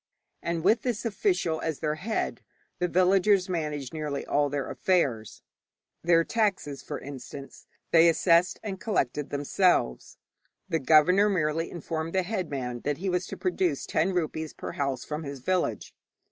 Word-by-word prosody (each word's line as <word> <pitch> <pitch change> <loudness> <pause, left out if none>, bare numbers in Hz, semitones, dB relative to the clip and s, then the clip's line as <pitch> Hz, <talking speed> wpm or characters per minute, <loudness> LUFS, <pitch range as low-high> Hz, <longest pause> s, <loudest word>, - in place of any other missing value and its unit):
And 170 -1 -2
with 215 +4 +4
this 240 -2 -2
official 210 - 0
as 160 -3 -2
their 150 -2 0
head, 200 +9 -3 0.4
the 180 - +1
villagers 185 +2 +3
managed 150 -6 -3
nearly 150 -3 -3
all 145 0 +1
their 140 -1 -2
affairs. 135 - 0 0.6
Their 165 -1 +4
taxes, 195 -10 -1
for - - -5
instance, 140 0 -9 0.2
they 165 0 +7
assessed 170 +2 +3
and 195 -3 -5
collected 150 - -1
themselves. 145 - +1 0.5
The 165 - 0
governor 180 +8 +5
merely 165 -3 0
informed 165 -1 -4
the 190 -1 +2
headman 140 - -3
that 145 +3 -2
he 190 +2 -2
was 180 0 -1
to - - -7
produce 365 -1 0
ten 165 +5 +1
rupees 160 -3 -2
per - - -6
house 135 -3 -2
from 150 +1 -4
his 140 -2 -6
village. 180 +7 -1
165 Hz, 150 wpm, -27 LUFS, 145-185 Hz, 0.6 s, they